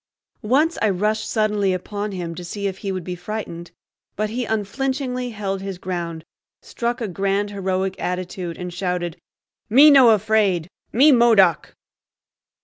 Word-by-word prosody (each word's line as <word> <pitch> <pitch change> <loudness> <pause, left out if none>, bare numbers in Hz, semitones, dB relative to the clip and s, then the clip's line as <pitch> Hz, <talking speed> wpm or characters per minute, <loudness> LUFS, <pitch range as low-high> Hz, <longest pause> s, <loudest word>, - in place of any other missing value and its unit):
Once 280 +9 +1
I 215 - +3
rushed 210 +3 -1
suddenly 210 -3 +1
upon 205 +3 -4
him 175 -3 -5
to 180 - -8
see 200 +4 -5
if 195 -1 -3
he 195 - -3
would 185 -2 -4
be 180 - -5
frightened; 175 -2 -6 0.5
but 215 +1 -2
he 245 +1 -2
unflinchingly 250 +4 -2
held 200 -3 -4
his 195 -1 -5
ground, 170 -3 -5 0.3
struck 240 +1 -4
a 225 - -1
grand 195 +2 -1
heroic 190 -1 -2
attitude, 180 -1 -4
and 180 -1 -6
shouted, 180 -2 -3 0.5
"Me 280 +7 +8
no 250 -6 +7
fraid; 200 -5 +1 0.2
me 280 +6 +6
Modoc!" 225 - +4
200 Hz, 145 wpm, -21 LUFS, 180-220 Hz, 0.5 s, Me